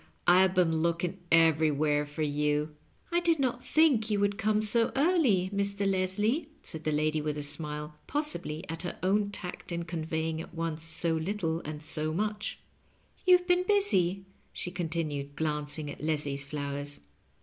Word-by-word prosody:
I 180 +1 +7
have 190 0 +3
been 165 -3 +3
looking 170 +3 -1
everywhere 155 -2 +3
for 145 +2 -3
you.". 150 +1 0 0.2
" - - -35
I 345 - +3
did 340 -2 +2
not 250 -3 -1
think 275 -9 +3
you 205 -1 +1
would 205 +1 +1
come 215 0 +2
so 230 +2 +4
early, 265 - +3
Mr. 200 0 0
Leslie," 205 - +1
said 160 -1 -6
the 155 - +1
lady 155 +1 +1
with 150 0 -2
a 145 - -2
smile, 150 0 -3
possibly 275 - -2
at 165 0 -4
her 175 - -5
own 200 +2 +2
tact 180 -3 -6
in 170 0 -3
conveying 160 -1 -2
at 170 - -11
on6e 165 -1 -2
so 165 +1 0
little 165 -1 -1
and 150 0 -6
so 155 0 -1
much; 210 +2 -2 0.7
"You've 360 -1 +6
been 360 0 +3
busy," 200 - +2 0.3
she 180 - -5
continued, 160 -5 -3
glancing 150 -1 -1
at - - -10
Leslie's 145 -3 -1
flowers. 145 -1 -5
170 Hz, 165 wpm, -30 LUFS, 155-205 Hz, 0.7 s, I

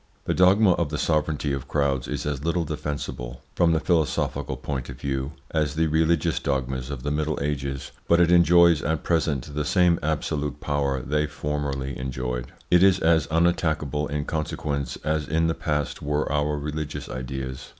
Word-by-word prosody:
The - - +1
dogma 95 +2 +5
of 85 -3 +1
the 75 - -3
sovereignty 75 -2 0
of 70 -2 -4
crowds 70 -4 0
is - - -3
as 70 -2 -2
little 85 +1 0
defensible, 75 -5 -5
from 85 -2 +3
the 80 - +2
philosophical 80 -5 0
point 65 -1 -4
of 65 -1 -8
view, 70 +1 -2 0.2
as 75 -2 0
the 80 +1 +2
religious 80 +1 +2
dogmas 65 -1 -2
of 70 -4 -6
the 75 - -1
Middle 75 +1 -1
Ages, 70 -2 -3 0.2
but 85 - +4
it 85 -1 +4
enjoys 85 -2 +6
at 80 0 -1
present 75 -5 0
the 75 +1 -1
same 90 +2 +3
absolute 75 -1 -2
power 70 -3 -1
they 75 +3 0
formerly 70 -2 -3
enjoyed. 60 -1 -4 0.2
It 90 0 +6
is 95 -1 +5
as 80 -2 +3
unattackable 80 -3 +1
in 75 0 -2
consequence 75 -4 -2
as 75 -1 -1
in 80 +1 +1
the 80 - +2
past 75 -3 -2
were 75 +1 0
our 75 0 0
religious 75 +1 -4
ideas. 65 +1 -5
75 Hz, 170 wpm, -25 LUFS, 70-80 Hz, 0.2 s, enjoys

